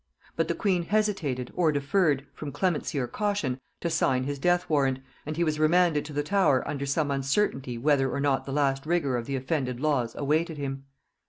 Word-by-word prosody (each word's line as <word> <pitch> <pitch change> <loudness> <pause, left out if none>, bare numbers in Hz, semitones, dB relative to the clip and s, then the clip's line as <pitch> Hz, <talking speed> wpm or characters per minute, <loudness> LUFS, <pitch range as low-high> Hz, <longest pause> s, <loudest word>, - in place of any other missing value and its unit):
But - - 0
the - - -1
queen 185 -5 +1
hesitated 180 - 0
or 170 -3 +3
deferred, 145 0 +1
from 150 -2 -6
clemency 170 -4 -1
or 130 - +1
caution, 200 - -1 0.2
to 170 - -1
sign 130 -5 +2
his 140 +1 -3
death 175 +3 +2
warrant, 135 -4 +2 0.3
and 155 0 -4
he 170 - +2
was 155 -2 0
remanded 160 -1 +3
to 150 - -8
the 145 +1 0
Tower 185 -7 +2
under 140 -1 -3
some 145 +1 0
uncertainty 135 - 0
whether 135 +1 +2
or 140 - -2
not 140 -1 +1
the 135 - -5
last 135 0 0
rigor 160 -6 +1
of 120 -1 -3
the 140 - -2
offended 130 -2 -2
laws 135 -6 0
awaited 155 +3 0
him. 135 -1 -4
145 Hz, 195 wpm, -27 LUFS, 135-165 Hz, 0.3 s, or